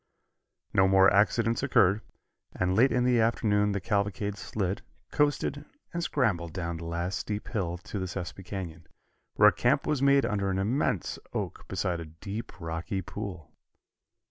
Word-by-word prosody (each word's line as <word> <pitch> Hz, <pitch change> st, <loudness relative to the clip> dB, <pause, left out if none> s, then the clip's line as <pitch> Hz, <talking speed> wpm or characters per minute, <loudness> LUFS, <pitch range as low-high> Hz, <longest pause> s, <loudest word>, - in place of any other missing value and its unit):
No 95 Hz, -, +5 dB
more 95 Hz, +1 st, +6 dB
accidents 115 Hz, +3 st, +3 dB
occurred, 105 Hz, -7 st, +3 dB, 0.5 s
and 90 Hz, 0 st, +1 dB
late 125 Hz, +6 st, +5 dB
in 125 Hz, -, +2 dB
the 125 Hz, -1 st, +3 dB
afternoon 105 Hz, -2 st, +2 dB
the 100 Hz, -, -1 dB
cavalcade 100 Hz, 0 st, -1 dB
slid, 100 Hz, -2 st, -3 dB, 0.3 s
coasted 145 Hz, 0 st, +1 dB, 0.3 s
and 170 Hz, 0 st, -2 dB
scrambled 90 Hz, -, 0 dB
down 85 Hz, -2 st, -3 dB
the 85 Hz, -, -7 dB
last 85 Hz, +3 st, -2 dB
steep 105 Hz, 0 st, -4 dB
hill 95 Hz, -7 st, -1 dB
into 100 Hz, +4 st, -6 dB
the 95 Hz, -, -2 dB
Sespe 90 Hz, +2 st, -6 dB
Canyon, 85 Hz, -4 st, -6 dB, 0.5 s
where -, -, +8 dB
a -, -, -3 dB
camp -, -, +2 dB
was 150 Hz, -3 st, 0 dB
made 140 Hz, -1 st, +5 dB
under 100 Hz, -4 st, 0 dB
an 95 Hz, -, 0 dB
immense 105 Hz, -, 0 dB
oak -, -, -4 dB
beside 90 Hz, -2 st, -1 dB
a 85 Hz, -, -6 dB
deep, 100 Hz, +6 st, -7 dB
rocky 85 Hz, +3 st, -3 dB
pool. 90 Hz, -6 st, -7 dB
100 Hz, 160 wpm, -29 LUFS, 90-110 Hz, 0.5 s, where